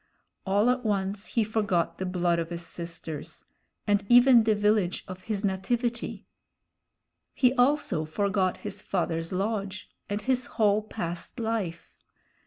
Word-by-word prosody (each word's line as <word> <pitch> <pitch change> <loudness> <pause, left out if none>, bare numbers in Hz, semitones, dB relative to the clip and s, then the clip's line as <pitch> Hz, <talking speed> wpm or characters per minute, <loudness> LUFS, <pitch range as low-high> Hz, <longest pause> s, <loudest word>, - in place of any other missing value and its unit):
All 205 +5 +4
at 250 0 -2
once 200 -1 -1
he 230 - +1
forgot 200 -6 0
the 185 - -2
blood 175 -2 +1
of 165 -1 -3
his 170 0 -5
sisters, 165 -2 -6 0.4
and 205 -1 +2
even 245 -1 +7
the 220 -1 +3
village 210 -3 +1
of 185 0 -9
his 210 -2 -2
nativity; 235 +5 -2 1.1
he 250 -1 +4
also 260 - +2
forgot 190 +2 0
his 205 -1 -6
father's 165 -4 -2
lodge, 200 0 -3 0.2
and 205 +1 -1
his 255 0 +1
whole 210 -1 +4
past 175 0 -5
life. 220 -7 -3
200 Hz, 135 wpm, -27 LUFS, 180-225 Hz, 1.1 s, even